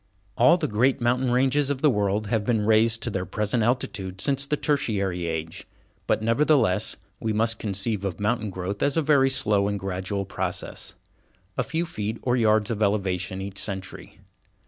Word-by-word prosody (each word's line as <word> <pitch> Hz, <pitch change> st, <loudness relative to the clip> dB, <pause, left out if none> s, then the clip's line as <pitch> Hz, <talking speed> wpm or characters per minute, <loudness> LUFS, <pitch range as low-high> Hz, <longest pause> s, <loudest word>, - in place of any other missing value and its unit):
All 170 Hz, -, +5 dB
the 160 Hz, -4 st, -1 dB
great 125 Hz, +4 st, +2 dB
mountain 125 Hz, +2 st, +1 dB
ranges 135 Hz, +3 st, +2 dB
of 140 Hz, 0 st, -3 dB
the 150 Hz, -, +6 dB
world 105 Hz, -1 st, 0 dB
have 105 Hz, 0 st, 0 dB
been 110 Hz, -1 st, +1 dB
raised 110 Hz, +1 st, +3 dB
to 120 Hz, -, 0 dB
their 95 Hz, -2 st, -2 dB
present 105 Hz, +5 st, -1 dB
altitude 100 Hz, -5 st, -1 dB
since 140 Hz, +5 st, 0 dB
the 150 Hz, -, 0 dB
Tertiary 100 Hz, -, -1 dB
Age, 80 Hz, +3 st, -5 dB, 0.4 s
but, 110 Hz, -, +1 dB
nevertheless, 115 Hz, -4 st, +2 dB, 0.2 s
we 110 Hz, -1 st, -1 dB
must 110 Hz, +1 st, +1 dB
conceive 100 Hz, 0 st, -2 dB
of 95 Hz, -4 st, -3 dB
mountain 105 Hz, +1 st, 0 dB
growth 95 Hz, +1 st, -5 dB
as 145 Hz, -, +1 dB
a 160 Hz, -, +2 dB
very 140 Hz, -3 st, +4 dB
slow 105 Hz, -7 st, +2 dB
and 100 Hz, 0 st, -2 dB
gradual 95 Hz, +1 st, -3 dB
process, 95 Hz, -1 st, -5 dB, 0.6 s
a -, -, +1 dB
few 160 Hz, +4 st, -2 dB
feet 110 Hz, -7 st, -4 dB
or 125 Hz, -1 st, +2 dB
yards 110 Hz, -2 st, +2 dB
of 110 Hz, -2 st, -3 dB
elevation 95 Hz, -2 st, 0 dB
each 100 Hz, 0 st, -6 dB
century. 95 Hz, -2 st, -5 dB
110 Hz, 175 wpm, -25 LUFS, 100-125 Hz, 0.6 s, the